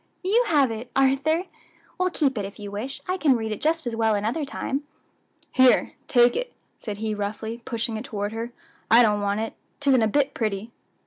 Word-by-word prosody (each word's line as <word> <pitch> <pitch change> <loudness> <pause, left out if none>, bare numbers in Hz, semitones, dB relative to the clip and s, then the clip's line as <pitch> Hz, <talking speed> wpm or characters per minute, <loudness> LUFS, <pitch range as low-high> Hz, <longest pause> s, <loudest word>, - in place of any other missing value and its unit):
you 445 +7 +3
have 280 -6 +3
it, 225 +2 -6
Arthur! 275 +5 +3 0.6
well, 365 0 +2
keep 285 -7 +1
it, 210 - -2
if 195 +1 -7
you 205 -1 -7
wish; 235 +8 -5
I 370 +1 0
can 295 -7 +4
read 220 -2 -2
it 215 - -4
just 320 +1 +1
as 240 -2 -2
well 225 -1 +2
another 225 +10 -1
time." 275 0 -3 0.7
"Here, 260 -1 +4
take 240 -1 +5
it," - - -3 0.2
said 210 -3 -6
he 215 0 -2
roughly, 215 +3 -4
pushing 230 -1 -2
it 220 - -5
toward 205 -1 -3
her; 230 +2 -4 0.4
"I 235 +2 +8
don't 210 -2 +2
want 205 +1 0
it; 225 - -3 0.3
'tisn't 275 -3 +4
a - - +3
bit 280 +5 +1
pretty." 215 0 -2
235 Hz, 200 wpm, -25 LUFS, 215-275 Hz, 0.7 s, I